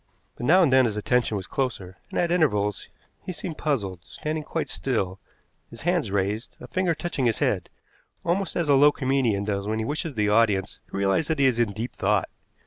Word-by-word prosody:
But 120 - -4
now 180 +4 +6
and 140 -6 +3
then 130 -1 +6
his 110 -3 -1
attention 115 0 +1
was 95 - -5
closer, 100 -9 -3
and - - -5
at 175 -1 +1
intervals 105 - +1 0.4
he - - -4
seemed 165 -2 -6
puzzled, 100 - -1
standing 155 - -4
quite 165 +2 -3
still, 100 -8 -2 0.5
his 115 - -11
hands 175 - +1
raised, 100 +3 -2
a - - -9
finger 185 -3 0
touching 145 -6 -1
his 115 - +1
head, - - 0 0.6
almost 180 +2 0
as 170 -3 0
a 145 - +5
low 145 +2 +7
comedian 130 -8 +1
does 100 -1 -2
when 110 +1 -1
he 110 - -1
wishes 150 +2 -3
the 105 -1 +1
audience 105 -3 +2
to - - -5
realize 100 +10 +1
that 160 - 0
he 140 - +3
is 125 -3 +3
in 115 -3 +2
deep 115 +4 -5
thought. - - +1
125 Hz, 210 wpm, -25 LUFS, 105-155 Hz, 0.6 s, low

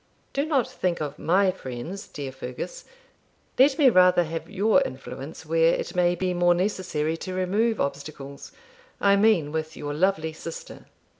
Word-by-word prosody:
Do 280 +2 0
not 275 -7 +2
think 175 -2 -2
of 150 -1 -5
MY 190 +2 +3
friends, 160 +4 -7
dear 140 -2 -6
Fergus; 130 - -7 0.7
let 270 +2 +5
me 290 -4 +5
rather 180 -2 +5
have 165 0 -5
your 215 +7 +3
influence 135 - -6
where 165 +1 +3
it - - -4
may 175 -1 +2
be 180 +1 -1
more 175 0 +3
necessary 175 -5 -1
to 185 +2 -6
remove 205 +5 +1
obstacles 140 0 -5 0.5
I 200 0 +4
mean 200 -8 +3
with 160 0 -4
your 145 0 -4
lovely 160 -1 +1
sister.' 165 +1 -9
175 Hz, 155 wpm, -25 LUFS, 155-195 Hz, 0.7 s, let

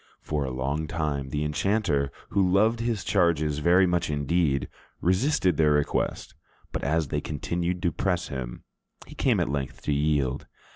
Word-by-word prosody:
For 75 -2 -1
a - - -3
long 70 +5 -2
time 75 -4 -2
the 75 +2 -1
enchanter, 75 -3 0 0.2
who 95 -3 +2
loved 110 +5 +3
his 115 -3 -1
charges 80 -6 +2
very 90 +5 +5
much 90 -2 0
indeed, 75 -2 +1 0.3
resisted 95 - +2
their 75 -2 +4
request; 75 -1 -1 0.4
but - - -4
as 80 +1 +1
they 75 - -1
continued 85 +5 -3
to 85 - +2
press 90 +2 -1
him, 60 -3 -6 0.4
he - - -12
came - - +2
at - - +1
length 70 -2 -4
to 75 - 0
yield. 70 -3 0
80 Hz, 160 wpm, -26 LUFS, 70-90 Hz, 0.4 s, very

